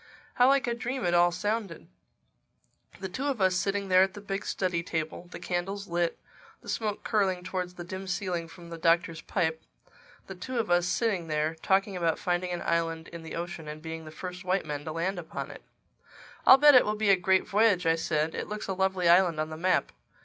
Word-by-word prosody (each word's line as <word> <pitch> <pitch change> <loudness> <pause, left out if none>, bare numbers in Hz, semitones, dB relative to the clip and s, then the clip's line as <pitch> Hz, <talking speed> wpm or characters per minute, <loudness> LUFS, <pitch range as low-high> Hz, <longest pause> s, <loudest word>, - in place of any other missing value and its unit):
How 250 - +5
like 275 0 +4
a 240 - 0
dream 240 0 -3
it 175 - +1
all 175 0 +5
sounded! 205 -1 -3 1.1
The 190 - -4
two 255 +10 -4
of 270 -5 -1
us 185 -1 +3
sitting 195 +2 -1
there 185 0 +5
at 190 +1 +2
the - - -7
big 200 -1 -4
study 180 -3 -1
table; 165 +1 -4
the - - -8
candles 195 +3 -3
lit; 170 0 -1 0.4
the - - -11
smoke 210 -2 -2
curling 190 -4 +1
towards 180 -1 -4
the 175 - -7
dim 190 +2 -7
ceiling 180 -2 -2
from 170 0 -13
the 165 - -7
Doctor's 165 0 +2
pipe—the 160 +2 -5
two 215 +8 -6
of 225 -6 -1
us 175 0 +3
sitting 195 -5 0
there, 155 0 0
talking 190 +4 +1
about 165 -3 0
finding 180 -1 -1
an 175 -1 -3
island 165 -1 -1
in 170 -1 -9
the 160 - -7
ocean 170 -2 -5
and 150 +1 -6
being 160 0 -6
the - - -8
first 180 +3 -7
white 185 +1 0
men 145 -1 -5
to 160 - -4
land 175 +4 -2
upon 165 - -6
it! - - -11 0.9
"I'll 260 - +10
bet 295 +1 +7
it 250 - +8
will 210 - -1
be 215 -1 +3
a - - +7
great 190 +1 +2
voyage," 205 -4 +3
I 165 - +4
said. 155 -1 -1
"It - - -4
looks 210 0 -5
a 190 - -1
lovely 190 -1 +1
island 175 -2 +5
on 155 0 -2
the - - -5
map. 180 +3 +1
180 Hz, 215 wpm, -28 LUFS, 170-195 Hz, 1.1 s, I'll